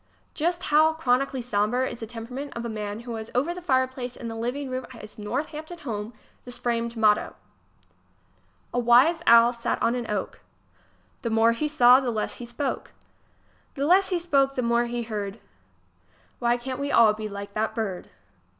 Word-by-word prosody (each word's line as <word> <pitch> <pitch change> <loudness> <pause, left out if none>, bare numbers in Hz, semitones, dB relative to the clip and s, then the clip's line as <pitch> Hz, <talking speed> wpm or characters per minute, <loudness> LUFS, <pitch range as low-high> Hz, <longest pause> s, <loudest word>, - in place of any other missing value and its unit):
Just 345 +3 -1
how 315 +1 +6
chronically 265 -3 0
sombre 235 +3 0
is 240 - -7
the 225 - -6
temperament 245 +5 -7
of 235 - -4
the 235 - -4
man 210 0 -5
who 240 0 -7
has 220 0 -7
over 285 +8 +1
the 360 - -8
fireplace 260 -5 0
in 235 - -6
the 225 - -6
living 250 +5 -3
room 255 0 -3
at 245 -3 -12
his 210 0 -12
Northampton 300 +10 -4
home 220 -7 -5 0.3
this 245 -1 -9
framed 235 -1 -2
motto: 215 -1 +2 1.4
A 245 - +1
wise 245 +8 +5
old 335 - -14
owl 235 +1 +7
sat 235 -1 -2
on 235 - +2
an 245 -2 -4
oak, 205 -2 -3 0.8
The 230 - -2
more 225 +1 +4
he 265 +6 -1
saw, 255 -4 +6
the 260 -2 -2
less 220 -2 -2
he 240 - -7
spoke. 260 +3 -4 0.8
The 280 - -1
less 375 +5 +4
he 365 - +1
spoke, 275 -5 +1
the 255 - -1
more 235 0 +2
he 240 0 -3
heard. 210 -2 -5 1.0
Why 240 0 +2
cant 255 +2 -5
we 285 0 -2
all 220 -2 +6
be 215 0 -5
like 200 0 -7
that 220 +1 -1
bird! 200 -6 -4
240 Hz, 185 wpm, -25 LUFS, 225-275 Hz, 1.4 s, owl